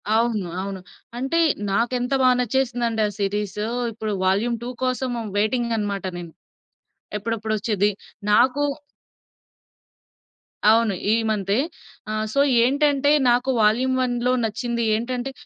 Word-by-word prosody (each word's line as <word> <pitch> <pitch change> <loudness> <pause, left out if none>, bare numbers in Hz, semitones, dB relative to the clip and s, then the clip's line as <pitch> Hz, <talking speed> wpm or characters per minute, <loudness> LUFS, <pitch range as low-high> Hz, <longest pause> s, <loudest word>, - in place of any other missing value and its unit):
అవును, 225 -4 +1
అవును. 195 -1 -5 0.4
అంటే 270 +7 0 0.3
నాకెంత 245 +4 0
బా 255 - +5
నచ్చేసిందండే 240 -2 0
ఆ - - -7
సీరీసు, 205 +1 -2 0.3
ఇప్పుడు 215 -1 -4
'వాల్యూమ్ 205 +6 +1
2' 245 - -4
కోసం 255 0 -1 0.3
వైటింగనమాట 215 -3 0
నేను. 170 -2 -8 0.9
ఎప్పుడప్పుడొచ్చేది. 215 -1 -1 0.4
నాకూ 250 +6 +4 2.1
అవును. 225 -1 +4 0.2
ఈ - - +4
మంతే. 200 -1 0 0.5
ఆహ్, 215 0 -1
సో, - - +1 0.2
ఏంటంటే 285 +2 +2 0.2
నాకు 245 +2 +2
'వాల్యూమ్ 245 +5 +3
1' 245 -1 -1
లో - - +3
నచ్చింది 235 +2 -2
ఏంటంటే, 245 +3 -3
230 Hz, 110 wpm, -23 LUFS, 210-250 Hz, 2.1 s, బా